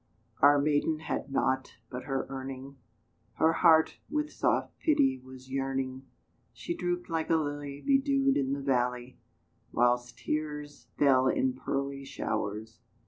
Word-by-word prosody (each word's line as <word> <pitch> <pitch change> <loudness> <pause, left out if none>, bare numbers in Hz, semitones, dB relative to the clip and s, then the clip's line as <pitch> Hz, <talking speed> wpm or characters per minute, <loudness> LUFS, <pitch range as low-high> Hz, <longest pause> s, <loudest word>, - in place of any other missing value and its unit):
Our 145 +1 +7
maiden 150 +2 +1
had 140 -3 -4
nought 130 -1 0 0.2
but 125 0 -6
her 135 -1 -1
earning 135 0 -7 0.6
Her 160 +1 +3
heart 160 -1 +4
with 300 0 -1
soft - - 0
pity 135 - +3
was 130 0 -13
yearning; 135 -1 -2 0.5
She - - -4
drooped 175 0 -2
like 165 -2 -2
a 165 - +4
lily 145 -2 -3
Bedewed 275 0 +3
in 135 0 0
the 140 0 -4
valley, 125 -1 -1 0.5
Whilst 120 0 +1
tears 150 -1 -4
fell 130 -2 +4
in 130 0 +1
pearly 140 +1 -3
showers. 110 -5 -4
135 Hz, 135 wpm, -30 LUFS, 130-155 Hz, 0.6 s, Our